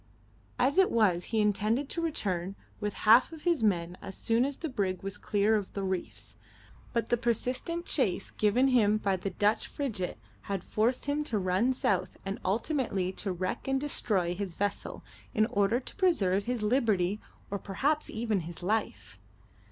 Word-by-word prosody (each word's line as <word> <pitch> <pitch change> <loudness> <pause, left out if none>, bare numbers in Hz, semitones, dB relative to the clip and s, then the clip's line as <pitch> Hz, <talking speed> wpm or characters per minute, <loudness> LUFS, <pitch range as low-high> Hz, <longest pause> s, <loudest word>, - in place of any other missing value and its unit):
As 280 +8 +3
it 380 - +5
was 190 -7 +2
he 225 - -1
intended 215 +6 +1
to 335 - -2
return 195 - -2 0.2
with 210 0 -3
half 230 +7 +7
of 320 -2 -10
his 340 -6 +2
men 180 -4 0
as 190 - -7
soon 230 +2 +2
as 280 0 -3
the 325 - -4
brig 195 -9 -2
was 195 0 -3
clear 210 +1 +1
of 205 -3 -2
the 200 - -3
reefs, 190 -2 -4 0.5
but 230 -2 -1
the 240 - +3
persistent 250 - -1
chase 195 - 0
given 235 +6 +3
him 215 -4 +4
by 200 -2 0
the 190 +2 -3
Dutch 210 +2 +1
frigate 220 -11 -3 0.3
had 195 -2 -2
forced 235 +4 0
him 290 +1 0
to 230 -7 -1
run 190 +6 +2
south 190 -7 0
and 195 +1 -3
ultimately 200 - 0
to 195 +1 -3
wreck 185 +6 -3
and 270 0 +2
destroy 205 -11 0
his 185 -2 -5
vessel 205 0 -2 0.3
in 215 - +4
order 205 +2 +2
to 260 - -8
preserve 205 - +2
his 245 -3 -2
liberty 210 -4 +1 0.3
or 200 - -2
perhaps 285 +12 -1
even 220 -2 -1
his 170 +1 -8
life. 100 - -2
210 Hz, 175 wpm, -30 LUFS, 190-250 Hz, 0.5 s, half